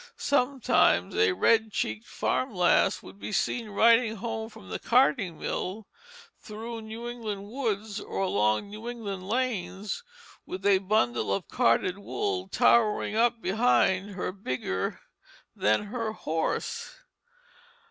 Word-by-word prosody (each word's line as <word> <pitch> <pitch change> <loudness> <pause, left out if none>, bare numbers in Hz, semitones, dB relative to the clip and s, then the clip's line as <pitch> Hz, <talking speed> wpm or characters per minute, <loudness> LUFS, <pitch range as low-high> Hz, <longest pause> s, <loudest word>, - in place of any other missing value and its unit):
Sometimes 275 -2 +2
a 440 -3 +4
red 225 -10 +3
cheeked 110 - -3
farmer's 255 -7 -1
lass 180 -1 +3
would 200 - -13
be - - -6
seen 225 +2 -1
riding 225 +2 +4
home 220 +1 -4
from 95 - -14
the 90 - -4
carding 230 - +2
mill, 200 +4 -4 0.5
through 225 +2 -7
New 220 +2 -7
England 215 -5 -5
woods 220 -4 -3
or - - -7
along 110 - +1
New 220 +3 -6
England 200 -6 -6
lanes, 215 - -2 0.4
with 190 +1 -7
a 200 -2 +5
bundle 120 - +1
of 100 - -1
carded 180 +12 +2
wool 395 - -2
towering 215 -2 +3
up 230 0 +2
behind 200 -2 +2
her 180 - -2
bigger 130 - -3 0.5
than 105 - +2
her 230 -3 -2
horse. 160 -6 -3
215 Hz, 125 wpm, -28 LUFS, 185-235 Hz, 0.5 s, a